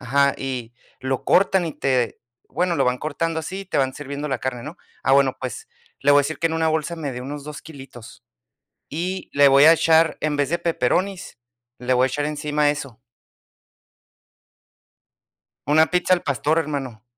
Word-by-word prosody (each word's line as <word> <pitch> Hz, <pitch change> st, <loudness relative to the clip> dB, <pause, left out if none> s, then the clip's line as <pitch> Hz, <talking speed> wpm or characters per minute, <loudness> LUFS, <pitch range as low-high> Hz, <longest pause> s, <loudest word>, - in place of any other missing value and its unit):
ajá, 140 Hz, +2 st, +2 dB
y 125 Hz, -3 st, -5 dB, 0.3 s
lo 130 Hz, 0 st, -2 dB
cortan, 190 Hz, -1 st, +3 dB
y 160 Hz, -, -4 dB
te 130 Hz, -4 st, -1 dB, 0.3 s
bueno, 180 Hz, -1 st, -1 dB
lo 135 Hz, -, +2 dB
van 125 Hz, 0 st, 0 dB
cortando 160 Hz, +3 st, -2 dB
así, 190 Hz, +5 st, -6 dB
te 185 Hz, -, -1 dB
van 130 Hz, -1 st, 0 dB
sirviendo 145 Hz, +1 st, -5 dB
la 130 Hz, -3 st, -1 dB
carne, 125 Hz, -2 st, -4 dB
¿no? 150 Hz, +4 st, -8 dB, 0.3 s
Ah, -, -, +2 dB
bueno, 135 Hz, -1 st, +4 dB
pues, 130 Hz, -1 st, -6 dB, 0.3 s
le 145 Hz, -, +3 dB
voy 145 Hz, -, +7 dB
a -, -, 0 dB
decir 155 Hz, +3 st, -4 dB
que 165 Hz, -, +1 dB
en -, -, -5 dB
una 160 Hz, 0 st, +1 dB
bolsa 160 Hz, +1 st, -1 dB
me 145 Hz, -4 st, -4 dB
de 125 Hz, -, -6 dB
unos 145 Hz, +2 st, -6 dB
2 150 Hz, -1 st, -8 dB
kilitos 135 Hz, -7 st, -12 dB, 0.7 s
y 180 Hz, +5 st, -4 dB
le 145 Hz, 0 st, +6 dB
voy 140 Hz, +2 st, +6 dB
a 160 Hz, -, +9 dB
echar, 160 Hz, -1 st, +3 dB
en 155 Hz, -1 st, 0 dB
vez 145 Hz, -1 st, 0 dB
de 170 Hz, -, 0 dB
pepperonis, 175 Hz, +4 st, -1 dB, 0.4 s
le 125 Hz, +1 st, 0 dB
voy 125 Hz, +1 st, +4 dB
a -, -, +1 dB
echar 145 Hz, +3 st, -2 dB
encima 150 Hz, 0 st, 0 dB
eso. 140 Hz, -6 st, -7 dB, 2.7 s
Una 155 Hz, +2 st, +5 dB
pizza 180 Hz, 0 st, +2 dB
al 175 Hz, -, 0 dB
pastor, 145 Hz, +3 st, 0 dB
hermano. 135 Hz, -8 st, -4 dB
145 Hz, 185 wpm, -22 LUFS, 135-160 Hz, 2.7 s, a